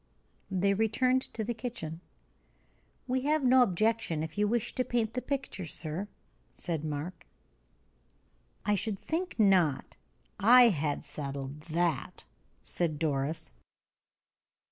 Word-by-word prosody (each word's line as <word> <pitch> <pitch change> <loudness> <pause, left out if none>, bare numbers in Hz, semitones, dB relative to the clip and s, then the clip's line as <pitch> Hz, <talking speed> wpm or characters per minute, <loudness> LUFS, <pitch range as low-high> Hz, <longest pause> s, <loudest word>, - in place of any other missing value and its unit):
They 195 +1 +2
returned 235 +5 +2
to 220 - -1
the 240 +3 -2
kitchen. 215 -9 -5 1.1
"We 255 0 0
have 305 0 +2
no 255 +1 +6
objection, 215 -6 +1
if 160 0 -6
you 210 0 +2
wish 230 +1 0
to 255 - 0
make 230 -2 +1
the 250 - -2
picture, 260 - -3
sir," 165 +5 -4 0.5
said 165 -4 -3
Mark. 155 +4 -5 1.4
"I 210 - +3
should 205 +1 -1
think 335 - -3
not. 185 -9 +3 0.4
I 240 +4 +8
had 150 -6 -1
settled 140 0 -6
that," 170 -2 -1 0.4
said 165 -4 -1
Doris. 150 0 -1
195 Hz, 120 wpm, -30 LUFS, 160-235 Hz, 1.4 s, I